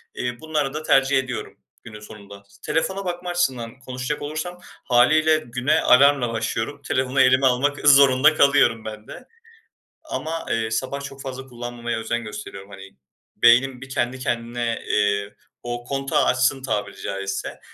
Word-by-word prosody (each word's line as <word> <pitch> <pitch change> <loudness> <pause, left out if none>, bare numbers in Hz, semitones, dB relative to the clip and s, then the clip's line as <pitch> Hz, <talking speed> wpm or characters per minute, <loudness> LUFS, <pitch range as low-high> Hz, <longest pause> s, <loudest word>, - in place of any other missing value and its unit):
Eee, 125 -1 -3
bunları 150 -3 -2
da 155 +1 -5
tercih 135 -1 +3
ediyorum 125 -2 -6 0.3
günün 105 -2 -10
sonunda. 100 -1 -13 0.2
Telefona 190 +4 -1
bakma 175 0 -4
açısından 130 -9 -2
konuşacak 130 +3 -5
olursam 155 +4 -5 0.3
hâliyle 155 +6 +4
güne 130 +3 0
alarmla 130 -2 +4
başlıyorum. 115 +5 -3
Telefonu 130 -1 0
elime 130 +1 +5
almak 145 +3 0
zorunda 140 +1 +6
kalıyorum 140 -6 +3
ben 105 0 -8
de. 255 - -11 0.8
Ama, 165 - -5
eee, 115 -1 -1
sabah 130 +5 -2
çok 135 -1 -9
fazla 130 0 -7
kullanmamaya 120 -1 -5
özen 115 +1 -3
gösteriyorum, 100 -2 -9
hani, 95 0 -11 0.5
beynim 125 +2 +4
bir 130 - -10
kendi 130 0 -2
kendine, 120 -1 -3
eee, 100 0 0 0.3
o 120 0 -5
kontağı 135 +3 0
açsın 130 +1 +1
tabiri 105 -5 -3
caizse, 100 0 -5
130 Hz, 140 wpm, -22 LUFS, 115-145 Hz, 0.8 s, zorunda